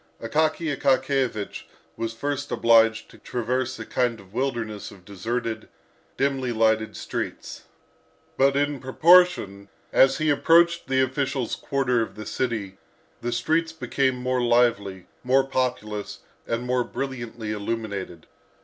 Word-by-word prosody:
Akaky 155 Hz, +4 st, 0 dB
Akakiyevich 130 Hz, -5 st, 0 dB, 0.3 s
was 115 Hz, 0 st, -3 dB
first 145 Hz, +4 st, -4 dB
obliged 115 Hz, -1 st, +4 dB
to -, -, -16 dB
traverse 125 Hz, +2 st, -2 dB
a -, -, -7 dB
kind 120 Hz, -3 st, 0 dB
of 100 Hz, 0 st, -17 dB
wilderness 115 Hz, -5 st, -3 dB
of 95 Hz, -3 st, -16 dB
deserted, 110 Hz, +3 st, -4 dB, 0.5 s
dimly 135 Hz, -2 st, 0 dB
lighted 110 Hz, -1 st, +1 dB
streets. -, -, -5 dB, 0.7 s
But 135 Hz, +1 st, +3 dB
in 145 Hz, 0 st, 0 dB
proportion 130 Hz, -, +4 dB, 0.2 s
as 135 Hz, 0 st, +5 dB
he 155 Hz, -1 st, +2 dB
approached 170 Hz, +3 st, +4 dB
the 130 Hz, 0 st, +2 dB
official's 130 Hz, -1 st, -1 dB
quarter 130 Hz, -4 st, 0 dB
of 110 Hz, -, -4 dB
the 110 Hz, 0 st, -8 dB
city, 105 Hz, -7 st, -3 dB, 0.4 s
the 120 Hz, -, -2 dB
streets 160 Hz, +7 st, 0 dB
became 135 Hz, -4 st, 0 dB
more 125 Hz, 0 st, -1 dB
lively, 115 Hz, -6 st, +2 dB, 0.2 s
more 130 Hz, +2 st, +4 dB
populous, 120 Hz, -6 st, -3 dB, 0.3 s
and 115 Hz, +1 st, -2 dB
more 125 Hz, 0 st, +1 dB
brilliantly 120 Hz, -5 st, -5 dB
illuminated. 100 Hz, -5 st, -4 dB
125 Hz, 125 wpm, -25 LUFS, 110-135 Hz, 0.7 s, as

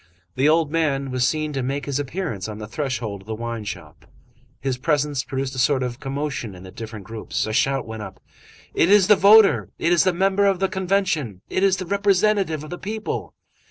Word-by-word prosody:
the 135 Hz, +6 st, +3 dB
old 160 Hz, -1 st, +2 dB
man 140 Hz, -5 st, 0 dB
was 125 Hz, 0 st, +2 dB
seen 155 Hz, -1 st, -1 dB
to 135 Hz, -, -1 dB
make 135 Hz, +3 st, -2 dB
his 140 Hz, -1 st, -2 dB
appearance 140 Hz, -, -4 dB
on 105 Hz, -1 st, -6 dB
the 105 Hz, -, -6 dB
threshold 115 Hz, -5 st, -4 dB
of 95 Hz, -, -20 dB
the 110 Hz, -, -3 dB
wine 115 Hz, 0 st, -4 dB
shop. 105 Hz, -, -9 dB, 0.5 s
His 130 Hz, -2 st, -2 dB
presence 145 Hz, -2 st, 0 dB
produced 135 Hz, 0 st, -3 dB
a 130 Hz, -, -4 dB
sort 130 Hz, 0 st, +2 dB
of 125 Hz, 0 st, -4 dB
commotion 135 Hz, -6 st, -4 dB
in 90 Hz, -, -12 dB
the 95 Hz, -, -10 dB
different 110 Hz, -2 st, -8 dB
groups. 110 Hz, +2 st, -3 dB
A 110 Hz, -, -4 dB
shout 135 Hz, +3 st, +1 dB
went 110 Hz, -1 st, -7 dB
up:— 95 Hz, -2 st, -9 dB, 0.5 s
"It 170 Hz, -, +3 dB
is 200 Hz, -2 st, +6 dB
the 210 Hz, -, +7 dB
voter! 195 Hz, -, +6 dB
It 170 Hz, -, +1 dB
is 170 Hz, -, +4 dB
the 185 Hz, -, +3 dB
member 195 Hz, +3 st, +2 dB
of 195 Hz, -1 st, +2 dB
the 195 Hz, 0 st, +1 dB
Convention! 180 Hz, -, -1 dB
It -, -, 0 dB
is 190 Hz, -1 st, +3 dB
the 185 Hz, -, -4 dB
representative 200 Hz, -4 st, +1 dB
of 155 Hz, -, -10 dB
the 175 Hz, -, -6 dB
people!" 215 Hz, +2 st, -4 dB
140 Hz, 215 wpm, -22 LUFS, 120-185 Hz, 0.5 s, the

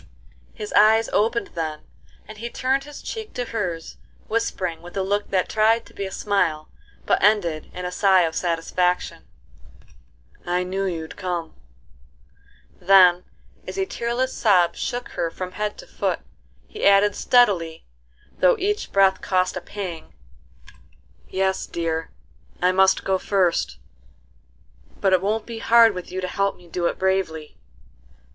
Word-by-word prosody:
His 210 Hz, -1 st, -7 dB
eyes 220 Hz, +1 st, +5 dB
opened 230 Hz, +3 st, 0 dB
then, 155 Hz, -2 st, -4 dB, 0.5 s
and 215 Hz, 0 st, -11 dB
he 235 Hz, +2 st, -5 dB
turned 265 Hz, +3 st, -1 dB
his 295 Hz, 0 st, -11 dB
cheek 440 Hz, -2 st, -7 dB
to 245 Hz, -, -2 dB
hers, 180 Hz, -8 st, -4 dB, 0.3 s
whispering 185 Hz, -7 st, -2 dB
with 175 Hz, +3 st, -10 dB
a 195 Hz, -, +1 dB
look 205 Hz, +2 st, -1 dB
that 185 Hz, -2 st, +1 dB
tried 225 Hz, +1 st, +2 dB
to -, -, -18 dB
be 200 Hz, -, -4 dB
a -, -, -9 dB
smile, 165 Hz, -7 st, -1 dB, 0.4 s
but -, -, +2 dB
ended 180 Hz, -7 st, +2 dB
in 180 Hz, -, -6 dB
a 180 Hz, -, -3 dB
sigh 190 Hz, -1 st, +4 dB
of 165 Hz, -2 st, 0 dB
satisfaction: 180 Hz, +1 st, -1 dB, 1.2 s
"I 180 Hz, +1 st, 0 dB
knew 190 Hz, +2 st, -2 dB
you'd 165 Hz, -4 st, -5 dB
come;" 175 Hz, -4 st, -4 dB, 1.3 s
then, 180 Hz, -1 st, +6 dB, 0.4 s
as -, -, -6 dB
a 385 Hz, -, +1 dB
tearless 250 Hz, -6 st, -2 dB
sob 185 Hz, -6 st, +3 dB
shook 245 Hz, 0 st, -4 dB
her 170 Hz, -2 st, -2 dB
from 185 Hz, +2 st, -6 dB
head 210 Hz, +2 st, -3 dB
to -, -, -11 dB
foot, -, -, -2 dB, 0.4 s
he 430 Hz, -, -9 dB
added 200 Hz, +1 st, +5 dB
steadily, 180 Hz, -10 st, +2 dB, 0.5 s
though 180 Hz, -, +4 dB
each 415 Hz, +3 st, -2 dB
breath 195 Hz, -1 st, +3 dB
cost 185 Hz, -1 st, 0 dB
a 185 Hz, -, -4 dB
pang, 175 Hz, -3 st, -7 dB, 1.1 s
"'Yes, 190 Hz, 0 st, -1 dB
dear, 165 Hz, -1 st, -3 dB, 0.5 s
I 180 Hz, +1 st, +3 dB
must 190 Hz, +1 st, +3 dB
go 190 Hz, -1 st, 0 dB
first, 180 Hz, -, 0 dB, 1.2 s
but 195 Hz, -, +2 dB
it 185 Hz, -, +4 dB
won't 215 Hz, +3 st, -1 dB
be 230 Hz, -1 st, -7 dB
hard 230 Hz, -1 st, +6 dB
with 180 Hz, -1 st, -7 dB
you 185 Hz, +1 st, -3 dB
to 185 Hz, -, -2 dB
help 200 Hz, +2 st, -1 dB
me 180 Hz, -, -18 dB
do 170 Hz, +1 st, -1 dB
it -, -, -3 dB
bravely." 185 Hz, -5 st, -2 dB
190 Hz, 150 wpm, -23 LUFS, 175-215 Hz, 1.3 s, then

